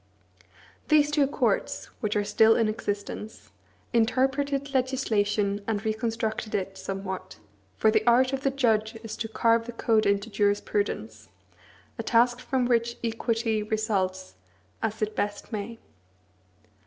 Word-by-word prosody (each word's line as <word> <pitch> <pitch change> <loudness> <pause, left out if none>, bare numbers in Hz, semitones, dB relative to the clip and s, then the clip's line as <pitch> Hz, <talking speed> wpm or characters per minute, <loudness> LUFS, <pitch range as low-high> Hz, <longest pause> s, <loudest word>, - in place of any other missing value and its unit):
These 300 -1 +4
two 295 -2 +3
courts, 285 - 0
which 215 -3 -1
are 205 - +2
still 220 +2 +5
in 225 - +2
existence, 210 0 -5 0.4
interpreted 270 +4 +1
legislation, 210 -6 +1
and 220 -1 -2
reconstructed 220 0 -2
it 195 0 -2
somewhat, 190 -1 -5 0.4
for 220 - +4
the 220 0 +2
art 255 +3 +5
of 270 - -1
the 275 - +2
judge 225 -4 +1
is 225 - -6
to 225 - -3
carve 230 +1 +2
the - - -4
code 225 -1 +2
into 200 +2 0
jurisprudence; 200 - -1 0.7
a - - +1
task 240 +1 +3
from 255 0 0
which 235 -1 +1
equity 225 -1 0
results 195 - -2 0.4
as 220 0 -2
it 215 0 -2
best 205 +3 -3
may. 215 +2 -4
220 Hz, 130 wpm, -27 LUFS, 205-240 Hz, 0.7 s, still